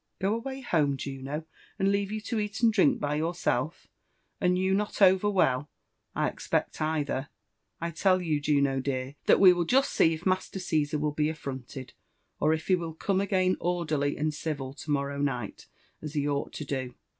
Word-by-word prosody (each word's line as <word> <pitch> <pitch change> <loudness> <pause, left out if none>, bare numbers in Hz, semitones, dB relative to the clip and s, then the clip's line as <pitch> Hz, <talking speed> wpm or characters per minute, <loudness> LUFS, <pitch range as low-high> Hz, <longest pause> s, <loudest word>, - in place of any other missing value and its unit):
" - - -51
Go 195 +2 +1
away 265 +4 -4
home, 150 - +1
Juno? 140 +3 -5 0.3
and 195 -1 +2
leave 200 0 0
you 215 - -2
to 225 +1 -2
eat 210 +1 -3
and 230 -2 +4
drink 190 -8 +4
by 145 0 -1
your 160 +3 -1
self 155 -1 -1 0.3
— - - -45
and 180 -1 +3
you 190 +1 +1
not 205 +1 -1
over 190 +1 +5
well, 145 -8 +2 0.5
I - - +1
expect, - - -2
either? 145 -3 -1 0.5
I 170 0 -3
tell 185 +3 +3
you, 155 -5 -1
Juno 140 -2 +2
dear» 130 0 -3
that - - +6
we 185 -2 +8
will 175 -1 0
just 270 +9 +3
see 160 0 +4
if 160 - -11
Master 185 +1 0
Ciesar 155 -5 0
will 150 0 0
be 150 +1 0
affronted, 130 -4 -7 0.5
or 155 - +3
if 160 0 -1
he 190 - +2
will 165 -3 -5
come 195 +3 0
again 185 -2 +1
orderly 155 -5 -1
and 155 +1 0
civil 145 -4 -4
to 150 - -10
morrow 140 -1 -1
night, 125 -7 -3 0.3
as 155 0 -7
he 145 -1 0
ought 145 0 -1
to 150 - -5
do. 130 -3 -4
155 Hz, 200 wpm, -28 LUFS, 140-185 Hz, 0.5 s, we